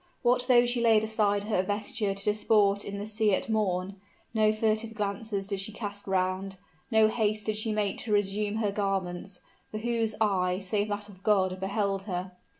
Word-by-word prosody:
What 245 0 +3
though 245 -2 +6
she 240 0 0
laid 225 -2 +5
aside 210 -2 +1
her 210 -3 +1
vesture 205 +1 -2
to 195 - -3
disport 210 -1 +3
in 200 0 -5
the 205 - -4
sea 215 -2 +2
at - - -4
morn? 195 -3 0 0.4
no 215 -1 +4
furtive 220 +1 -1
glances 200 0 -3
did 200 -1 -3
she 195 +3 -4
cast 205 -2 -6
round; 190 +1 -1 0.3
no 220 -2 +5
haste 215 -1 0
did 215 - -1
she 215 +1 -1
make 210 -2 -1
to 220 - -5
resume 205 +1 +1
her 215 -2 0
garments; 195 -2 -3 0.3
for 215 - -5
whose 225 -1 -1
eye, 185 -4 +1
save 205 +2 -1
that 205 0 -4
of 190 -3 -15
God, 190 -3 +2
beheld 195 0 -1
her? 180 0 -3
205 Hz, 185 wpm, -28 LUFS, 195-220 Hz, 0.4 s, though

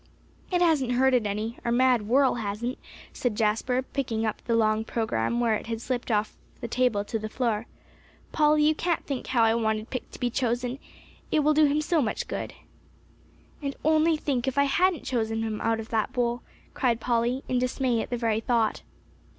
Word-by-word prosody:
"It 355 -1 +3
hasn't 285 -7 +2
hurt 265 +1 +3
it 240 -4 +2
any 215 +3 -3
our 235 - -1
mad 245 -3 +3
whirl 265 +3 +4
hasn't," 220 +5 -3 0.3
said 245 -4 -1
Jasper, 230 +4 +1
picking 240 -5 -2
up 215 - -3
the 230 - 0
long 215 -1 +2
program 220 - -1
where 235 -2 +2
it 215 - -3
had 225 -1 -3
slipped 245 +1 -3
off 215 -1 0 0.3
the - - -5
table 235 -4 +1
to 225 - -3
the 215 0 -5
floor. 230 -2 -1 0.6
"Polly, 300 -1 +3
you 310 +1 +4
can't 340 +2 -1
think 275 -3 -4
how 240 -3 +2
I 225 0 +4
wanted 220 -1 -1
Pick 255 - -4
to - - -12
be 245 -1 0
chosen. 245 +1 -1 0.5
It 310 - +3
will 305 +1 +3
do 305 0 +5
him 295 +1 +2
so 315 +1 +1
much 220 -5 -2
good." - - -5 1.1
"And 280 -1 -3
only 315 +1 +4
think, 270 -5 -1
if 265 - -2
I 280 - +5
hadn't 350 +5 +2
chosen 225 -2 -1
him 220 -1 -3
out 225 0 +1
of 225 - -7
that 225 +2 -1
bowl!" 240 -1 0 0.3
cried 240 -4 +1
Polly, 240 +2 0
in 250 - +1
dismay 250 -2 0
at - - -6
the 245 - -1
very 225 -2 0
thought. 225 -1 0
240 Hz, 200 wpm, -26 LUFS, 225-265 Hz, 1.1 s, do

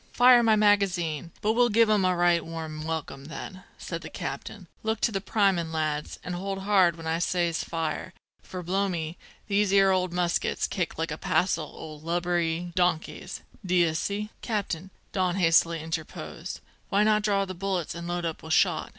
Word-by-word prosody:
"Fire 245 0 +7
my 225 -2 +4
magazine, 185 -7 +2
but 215 +1 +3
we'll 240 +1 +4
give 230 +1 +5
'em 210 -3 +3
a 185 0 +3
right 175 -1 +3
warm 160 -2 -6
welcome, 155 -4 -4
then," 185 +4 -8
said - - -5
the - - -8
captain. - - -6 0.2
"Look 220 -1 -1
to 235 - +2
the 195 -2 -2
primin', 190 -6 +1
lads, 155 -2 -2
an' 180 - -4
hold 195 +2 -4
hard 190 -4 +4
when 165 -1 -10
I 160 +1 0
says 170 -1 0
fire, 165 +2 -3 0.3
for 185 -1 -7
blow 195 +3 0
me, 165 -2 -4 0.3
these 205 -1 +2
'ere 195 -1 +5
old 185 -1 +1
muskets 175 -1 0
kicks - - -3
like - - -2
a - - -4
passel - - 0
o' 155 -1 -8
lubberly 175 0 -1
donkeys, 175 -2 -1 0.2
d'ye 175 -3 +3
see!" 205 +6 -2
"Captain," 190 -5 -3 0.2
Don 185 -2 0
hastily 165 -2 +4
interposed, 165 +1 -6 0.3
"why 200 +1 +3
not 215 0 +4
draw 200 -1 +1
the 185 - -6
bullets 185 -2 -2
and 170 0 -6
load 175 0 -2
up 165 -1 -3
with 160 0 -3
shot? - - +2
175 Hz, 180 wpm, -27 LUFS, 165-200 Hz, 0.3 s, Fire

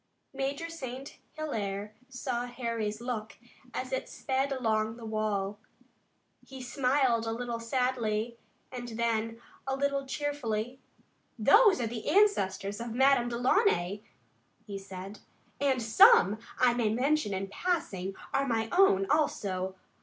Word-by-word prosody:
Major 275 +4 -2
St. 270 -5 -7
Hilaire 210 -9 -3 0.2
saw 250 -2 -3
Harry's 230 -3 -3
look 230 -3 -4 0.3
as 255 +1 -4
it 260 - -2
sped 270 +1 -1
along 220 -3 0
the 235 - -9
wall. 210 -2 -1 0.8
He 265 -1 -11
smiled 250 -2 +1
a - - 0
little 235 0 -3
sadly 235 -2 -1 0.3
and 245 -2 -6
then, 230 -1 -1 0.3
a 265 - 0
little 275 0 -1
cheerfully: 260 -4 -2 0.6
"Those 400 - +6
are 240 - 0
the 225 -1 -5
ancestors 205 - +2
of 235 -1 -5
Madame 265 -2 +4
Delaunay," 240 - +2 0.6
he 200 -2 -6
said, 195 +1 -9 0.4
"and 270 -2 +2
some, 230 - +6 0.2
I 250 -1 +4
may 235 -3 +1
mention 270 0 +1
in 195 0 -2
passing, 200 - -2 0.2
are 275 0 +1
my 225 -2 0
own, 350 - +5
also. 190 -11 0
240 Hz, 125 wpm, -30 LUFS, 215-270 Hz, 0.8 s, Those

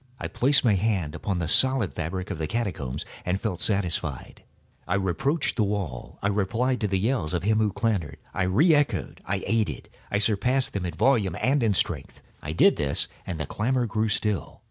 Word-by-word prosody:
I - - -3
placed 135 +2 +2
my 110 - +5
hand 95 -6 0
upon 95 -3 -2
the 85 -2 -2
solid 130 -1 +4
fabric 90 +3 -4
of 85 - -5
the 80 - -1
catacombs, 95 - -3 0.2
and 90 +2 -1
felt 95 -6 -3
satisfied. 90 - -2 0.4
I 90 - +1
reapproached 135 - 0
the 110 - +3
wall. 100 -11 -3
I - - +2
replied 110 +6 0
to 105 - +1
the 95 -1 0
yells 95 -5 0
of 85 - -2
him 110 +2 +2
who 105 -2 +2
clamored. 90 - -1 0.2
I 95 - 0
re 145 - +4
echoed—I 105 -8 -1
aided—I 105 - -2
surpassed 115 +6 +2
them 95 -3 -2
in 85 - -6
volume 105 -7 +2
and 140 +2 +2
in 110 -4 +2
strength. 75 -7 -2 0.2
I 75 - -5
did 80 - +4
this, 70 -1 +1 0.2
and 85 -4 -4
the 80 - -2
clamorer 125 - 0
grew 110 0 0
still. 105 -2 -1
100 Hz, 190 wpm, -26 LUFS, 90-115 Hz, 0.4 s, my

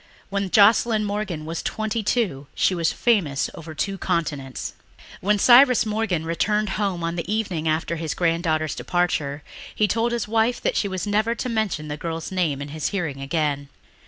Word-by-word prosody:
When 200 -1 -1
Joscelyn 215 +2 +5
Morgan 200 -6 -3
was 165 +1 -4
twenty 220 +1 -2
two 195 - -1
she - - +2
was 170 -2 +1
famous 175 - +1
over 160 -1 -9
two 195 +5 -2
continents. 145 -7 -2 0.5
When 210 +2 +2
Cyrus 250 +3 +6
Morgan 210 -7 -1
returned 210 +5 0
home 195 -4 -1
on 170 +1 -2
the 175 +3 -3
evening 195 -7 -1
after 160 +2 0
his 160 -1 -3
granddaughter's 165 -3 0
departure 155 -5 -1 0.3
he 210 - +3
told 230 +4 +1
his 235 -2 -2
wife 225 +2 +1
that - - 0
she 205 - +1
was 185 0 -3
never 215 +3 +1
to 250 - -3
mention 215 -9 -1
the 150 0 -4
girl's 165 +1 -5
name 160 -7 0
in 145 - -8
his 155 +1 -2
hearing 165 -9 -3
again. 145 -1 -1
180 Hz, 175 wpm, -23 LUFS, 155-215 Hz, 0.5 s, Cyrus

